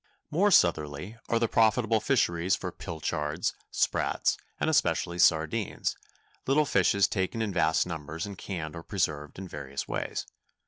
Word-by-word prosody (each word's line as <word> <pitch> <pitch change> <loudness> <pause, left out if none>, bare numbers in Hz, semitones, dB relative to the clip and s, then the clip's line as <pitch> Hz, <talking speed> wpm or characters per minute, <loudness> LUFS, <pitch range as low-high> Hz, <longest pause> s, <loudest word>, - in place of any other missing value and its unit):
More 190 +7 +3
southerly 85 - +2
are 115 - +3
the 115 - +2
profitable 110 0 +3
fisheries 95 -8 +2
for 90 - -5
pilchards, 80 -1 -3 0.2
sprats, - - +1 0.2
and - - 0
especially 85 +1 +1
sardines—little 105 - 0
fishes 100 -7 +3
taken 95 +3 -2
in 110 -3 -1
vast 80 -1 +2
numbers 80 0 -5
and 100 -1 -7
canned 85 -5 -5
or 85 - -6
preserved 75 -6 -2
in 95 0 -6
various 70 -4 -6
ways. - - -3
90 Hz, 135 wpm, -28 LUFS, 80-110 Hz, 0.2 s, More